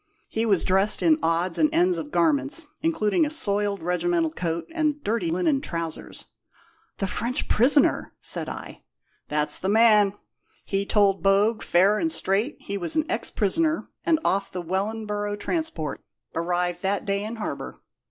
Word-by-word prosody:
He 225 +1 -1
was 195 -5 +2
dressed 195 +3 +3
in 320 -1 +4
odds 165 +1 0
and 305 - +4
ends 350 +2 +2
of 295 - -6
garments, 305 0 +1 0.2
including 320 -3 +1
a 300 - 0
soiled 205 - -1
regimental 175 -2 0
coat 165 0 -3
and 305 -3 -1
dirty 205 -5 -1
linen 185 - +1
trousers." 165 - -5 0.7
"The 195 - -1
French 235 +7 -2
prisoner!" 275 +6 +3
said - - -1
I. - - -8 0.5
"That's 150 0 +1
the 190 - -2
man. 210 -2 +5 0.5
He 195 0 -2
told 200 -2 +3
Bogue, 200 +3 +3
fair 195 +5 +3
and 325 - 0
straight, 210 +4 -1
he 200 0 -4
was 170 -3 -1
an 315 - +2
ex 225 - -2
prisoner, 315 - 0
and 330 -2 +3
off 195 0 0
the 180 -2 -5
Wellinboro' 205 +3 -2
transport, 205 - -3 0.3
arrived 175 +1 -1
that 200 +1 -1
day 200 0 -1
in 220 +2 -5
harbour. 220 - -6
205 Hz, 155 wpm, -25 LUFS, 180-280 Hz, 0.7 s, man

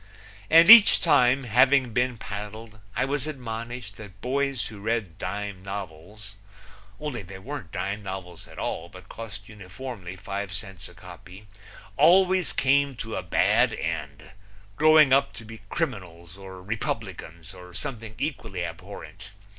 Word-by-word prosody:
And 165 +1 +7
each 225 0 +10
time, 135 -4 +3
having 130 +1 +3
been 125 0 0
paddled, 110 +2 -8 0.2
I - - +1
was 145 +1 -2
admonished 115 -5 -6
that 105 -2 -12
boys 135 -2 -1
who 105 -2 -11
read 110 -5 -3
dime 100 0 -5
novels 100 +2 -8 0.7
only 150 -6 -4
they 95 0 -10
weren't 95 - -8
dime 100 +2 -3
novels 95 -3 -8
at - - -15
all 85 - -4
but 95 0 -14
cost 100 -3 -9
uniformly 105 -1 -8
five 100 0 -5
cents 95 +1 -7
a - - -17
copy 95 +4 -13 0.5
always 185 +3 +4
came 140 0 +2
to 115 -1 -6
a - - -2
bad - - +2
end, 75 -2 -5 0.4
growing 155 -1 +6
up 135 - +3
to 115 - -11
be 110 0 -11
criminals 85 -2 -4
or 95 -1 -11
Republicans 95 -5 -5
or 90 -1 -12
something 110 +3 -7
equally 115 - -3
abhorrent. 85 +3 -10
105 Hz, 140 wpm, -26 LUFS, 95-130 Hz, 0.7 s, each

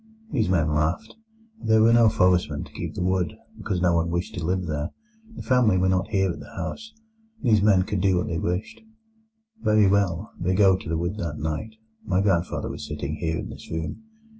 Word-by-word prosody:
These 115 - +1
men 80 -4 +2
laughed. 80 +9 -1 0.5
There 110 0 +4
were 115 +1 +5
no 115 -1 +6
forestmen 90 -7 +2
to - - -13
keep - - -6
the - - -2
wood, 95 +3 0 0.2
because 95 -4 -2
no 90 -1 +4
one 85 0 +1
wished 85 +1 -2
to 90 - -5
live 90 +2 -1
there. 75 -1 -2 0.5
The - - -7
family 125 -7 +3
were 95 +1 +2
not 95 +2 +1
here 95 -3 +1
at - - -7
the - - -12
house. 220 0 -6 0.5
These 110 -5 +4
men 100 -3 +4
could 100 -1 -2
do 95 -2 +3
what 90 - 0
they 85 - -2
wished. 90 +4 -3 0.8
"Very 105 -1 +4
well, 100 -1 +1
they 90 +2 0
go 95 -1 +5
to 90 -4 -7
the 80 - 0
wood 85 +5 -2
that 85 -7 -4
night. 80 +9 -4 0.3
My 90 -1 0
grandfather 95 -3 0
was 75 - -6
sitting 75 0 -4
here 80 -1 -1
in - - -5
this - - -11
room. 80 - -4
90 Hz, 210 wpm, -25 LUFS, 85-105 Hz, 0.8 s, no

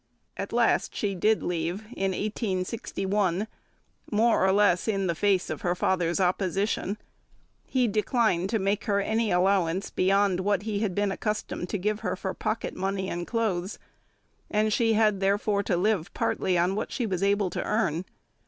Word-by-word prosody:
At - - -5
last - - +2
she 205 -2 -1
did 215 +4 +2
leave, 175 +3 -2
in 195 0 0
1861, 195 -1 -1 0.7
more 225 +1 +3
or 190 - +4
less 195 -2 +3
in 195 -3 0
face 195 +2 +1
of - - -5
her 175 0 0
father's 180 -1 +1
opposition; 190 +2 0 0.7
he 255 -2 +2
declined 210 -3 +1
to 225 - +1
make 200 0 -1
her 200 -3 +2
any 220 +2 0
allowance 185 0 +1
beyond 195 0 +2
what 200 0 +1
he 210 -2 -2
had 205 -4 -1
been 205 -1 +1
accustomed 210 -4 -3
to - - -1
give 210 +3 -1
her 185 -4 -2
for 190 0 -4
pocket 230 - -3
money 190 0 -2
and 175 0 -4
clothes, 205 -5 -1 0.7
and 215 0 +1
she 225 0 +3
had 215 -2 +3
therefore 200 +1 +1
to 190 -3 0
live 190 -2 0
partly 185 -2 0
on 175 +2 +2
what 210 - -3
she 245 - -1
was 190 -4 -2
able 200 -1 +2
to - - -2
earn. 180 -6 0
195 Hz, 165 wpm, -27 LUFS, 185-210 Hz, 0.7 s, or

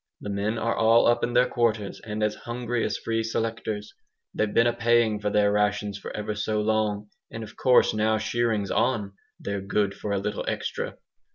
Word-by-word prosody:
The 105 - -5
men 105 +3 -1
are 115 +1 0
all 115 +1 +5
up 120 0 +3
in 120 - 0
their 125 +1 +5
quarters, 110 -4 -1
and 105 -1 -3
as 105 0 +1
hungry 120 0 -3
as - - -1
free 115 0 -1
selectors. 110 -2 -3 0.4
They've 110 -1 0
been 115 - +4
a 120 - +3
payin' 115 -2 +2
for 105 0 -1
their 105 0 +3
rations 105 -1 0
for - - -7
ever 105 0 -3
so 105 +1 -1
long, 105 -1 0 0.2
and 115 - -6
of 110 0 -11
course 125 -1 +4
now 110 +1 +2
shearing's 110 -2 0
on, 105 -6 0 0.3
they're 100 -1 -3
good 100 0 0
for 105 - -5
a 100 - +1
little 105 +1 -3
extra!" - - -3
110 Hz, 195 wpm, -26 LUFS, 105-115 Hz, 0.4 s, all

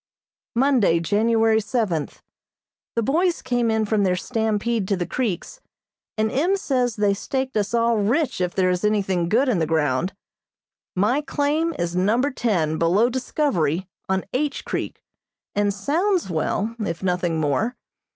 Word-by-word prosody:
Monday, 240 -10 +3
January 220 +5 +2
seventh: 205 - -2 0.7
The 230 - +1
boys 335 - +1
came 245 -2 +1
in 220 -1 +1
from 215 0 +1
their 185 -2 +2
stampede 220 0 -1
to 200 - 0
the 175 - -2
creeks, 240 - -3 0.6
and 215 0 +1
M. 350 +9 +2
says 250 - 0
they 205 -1 +2
staked 265 +6 -3
us 210 +2 0
all 230 0 +2
rich 235 - 0
if 180 -1 -1
there 185 -1 +3
is 180 +1 -2
anything 190 -5 +1
good 245 +8 +3
in 230 -8 +2
the 160 - 0
ground. 155 +2 0 0.8
My 215 +10 +2
claim 305 +2 0
is 175 0 -2
Number 225 +10 +2
Ten, 170 - 0
below 195 +9 +3
Discovery, 190 - 0 0.2
on 190 0 0
H. 280 +2 -1
Creek, - - -4 0.5
and 205 0 +1
sounds 320 - 0
well, 205 +7 -1
if 170 -5 -3
nothing 180 -3 0
more. 190 - 0
215 Hz, 150 wpm, -23 LUFS, 180-255 Hz, 0.8 s, Monday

